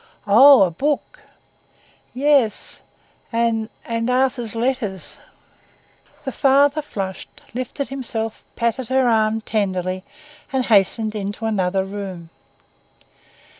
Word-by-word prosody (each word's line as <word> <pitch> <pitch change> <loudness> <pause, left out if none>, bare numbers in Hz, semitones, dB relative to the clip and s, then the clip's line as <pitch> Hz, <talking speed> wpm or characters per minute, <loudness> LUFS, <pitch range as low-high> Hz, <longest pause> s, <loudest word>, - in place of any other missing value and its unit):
"Oh, 255 +4 +8
a 180 - +1
book?" 290 - -2 0.9
"Yes, 265 -5 +1 0.5
and—and 230 0 -1
Arthur's 250 -3 0
letters." 230 -6 -2 1.1
The 265 - -2
father 280 +3 +3
flushed, 195 -9 -7
lifted 255 +3 -4
himself, 225 -5 -3
patted 235 +1 -1
her 260 -1 +3
arm 220 -1 +2
tenderly 185 -4 -2 0.5
and 265 -2 0
hastened 215 +1 +3
into 205 +1 -4
another 190 -3 0
room. 190 -4 -7
225 Hz, 95 wpm, -21 LUFS, 200-260 Hz, 1.1 s, Oh